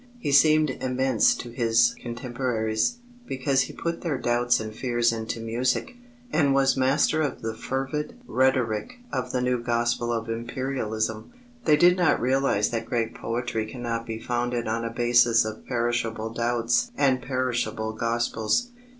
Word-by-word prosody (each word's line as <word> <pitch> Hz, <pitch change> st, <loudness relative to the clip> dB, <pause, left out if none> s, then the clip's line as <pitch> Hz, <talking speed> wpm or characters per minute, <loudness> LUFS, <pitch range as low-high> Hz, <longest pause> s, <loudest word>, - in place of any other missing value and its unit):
He 230 Hz, -12 st, -3 dB
seemed 155 Hz, +1 st, +5 dB
immense 130 Hz, -2 st, +2 dB
to 120 Hz, -, -7 dB
his 115 Hz, -1 st, +3 dB
contemporaries, 120 Hz, -, -2 dB, 0.3 s
because 135 Hz, 0 st, +1 dB
he 125 Hz, -, -4 dB
put 170 Hz, 0 st, -3 dB
their 155 Hz, -6 st, -1 dB
doubts 120 Hz, 0 st, +2 dB
and 110 Hz, -1 st, -5 dB
fears 120 Hz, 0 st, +1 dB
into 110 Hz, 0 st, -4 dB
music, 120 Hz, -, -1 dB, 0.4 s
and 140 Hz, -3 st, +3 dB
was 135 Hz, -1 st, +3 dB
master 135 Hz, +4 st, +2 dB
of 145 Hz, -6 st, -3 dB
the 110 Hz, 0 st, -2 dB
fervid 135 Hz, -, -3 dB
rhetoric 130 Hz, -, 0 dB, 0.2 s
of 125 Hz, -2 st, -2 dB
the 125 Hz, -1 st, 0 dB
new 125 Hz, -1 st, 0 dB
gospel 120 Hz, 0 st, 0 dB
of 115 Hz, -1 st, -2 dB
Imperialism. 115 Hz, -, -3 dB, 0.3 s
They 150 Hz, -2 st, +5 dB
did 175 Hz, +3 st, +5 dB
not 175 Hz, -4 st, +3 dB
realize 130 Hz, -4 st, +1 dB
that 115 Hz, -1 st, -3 dB
great 115 Hz, -2 st, -1 dB
poetry 115 Hz, -1 st, -3 dB
cannot 115 Hz, 0 st, -4 dB
be 110 Hz, -1 st, -4 dB
founded 120 Hz, +1 st, -2 dB
on 115 Hz, +1 st, -1 dB
a 115 Hz, -, -2 dB
basis 120 Hz, -1 st, +4 dB
of 110 Hz, 0 st, -7 dB
perishable 115 Hz, -2 st, -1 dB
doubts 120 Hz, -, +1 dB
and 130 Hz, -2 st, +2 dB
perishable 120 Hz, -3 st, -2 dB
gospels. 115 Hz, -, 0 dB
120 Hz, 150 wpm, -25 LUFS, 115-130 Hz, 0.4 s, seemed